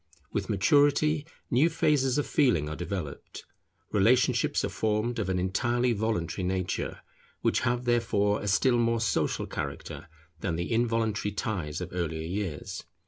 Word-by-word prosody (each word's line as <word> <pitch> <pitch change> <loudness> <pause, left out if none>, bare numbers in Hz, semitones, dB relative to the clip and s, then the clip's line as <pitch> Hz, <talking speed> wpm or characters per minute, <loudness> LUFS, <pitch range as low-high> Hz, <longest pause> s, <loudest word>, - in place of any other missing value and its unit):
With - - -2
maturity 145 +1 +3 0.2
new 140 +7 +4
phases 150 -5 +2
of 145 - +1
feeling 120 - +2
are 75 - -4
developed. 85 -4 -6 0.5
Relationships 115 +5 +3
are - - -2
formed 110 +2 -1
of 100 -4 -1
an 95 - 0
entirely 120 +7 +1
voluntary 100 -5 -1
nature; 95 0 -2 0.4
which - - +2
have 120 +1 0
therefore 110 -4 +2
a 105 - -4
still 120 +5 +3
more 115 0 +2
social 110 -2 0
character 70 - -6 0.3
than 85 -1 -2
the 85 +7 -3
involuntary 115 -3 0
ties 95 -7 -3
of - - -4
earlier 80 -3 -2
years. 90 -3 -4
110 Hz, 140 wpm, -28 LUFS, 90-120 Hz, 0.5 s, new